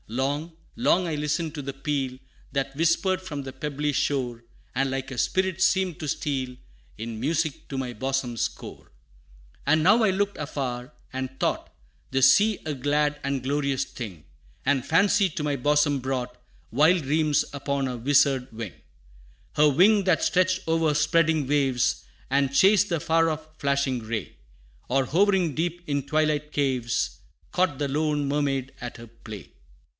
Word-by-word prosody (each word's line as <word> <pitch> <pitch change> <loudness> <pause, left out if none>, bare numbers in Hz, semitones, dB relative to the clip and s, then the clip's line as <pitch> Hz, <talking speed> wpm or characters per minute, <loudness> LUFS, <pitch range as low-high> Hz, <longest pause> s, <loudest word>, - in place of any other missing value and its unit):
Long, 140 +8 -2 0.2
long 185 -7 +2
I 160 - -2
listened 150 +2 -1
to 145 - -4
the 140 0 -4
peal, 135 -2 -2 0.3
That 135 0 -2
whispered 170 +4 +2
from 150 -7 -5
the 135 -1 -7
pebbly 145 +1 -2
shore, 125 -5 -1 0.3
And 135 +1 +1
like 135 0 -3
a 130 - -6
spirit 190 +7 0
seemed 190 -3 +2
to 155 - -4
steal 135 -4 -2 0.4
In 110 0 -5
music 155 +3 -1
to 135 - -4
my 125 -2 -3
bosom's 125 -1 -1
core. - - -12 0.7
And 155 +2 +3
now 215 +6 +5
I 215 - +4
looked 200 +1 0
afar, 130 -3 -4 0.2
and 130 0 -3
thought - - -1 0.4
The 135 0 0
sea 205 +11 +5
a 155 - -2
glad 145 +2 0
and 140 -1 -1
glorious 140 -1 0
thing; 100 - -8 0.4
And 135 -1 +2
fancy 195 +3 +3
to 155 - -5
my 145 -1 0
bosom 145 +1 +2
brought 125 -1 -3 0.4
Wild 155 +7 +4
dreams 150 +1 +2
upon 140 -1 -1
her 130 -1 -3
wizard 135 +1 +2
wing 110 -4 -6 0.8
Her 150 0 +5
wing 195 +8 +5
that 180 -4 +2
stretched 185 -1 +1
o'er 160 -1 +2
spreading 155 -1 +2
waves, 135 -4 +1 0.3
And 135 0 +1
chased 200 +5 +5
the 170 -3 0
far 165 +1 +2
off 155 0 -4
flashing 140 -2 +1
ray, 110 -1 -5 0.5
Or 135 +1 +2
hovering 185 +1 +2
deep 175 +2 -2
in 140 -2 0
twilight 150 +1 0
caves, 130 -5 -1 0.3
Caught 180 -6 +1
the 145 - -1
lone 150 0 0
mermaid 140 -2 -1
at 120 -1 -6
her 115 0 -11
play. 110 -3 -11
145 Hz, 160 wpm, -26 LUFS, 130-160 Hz, 0.8 s, now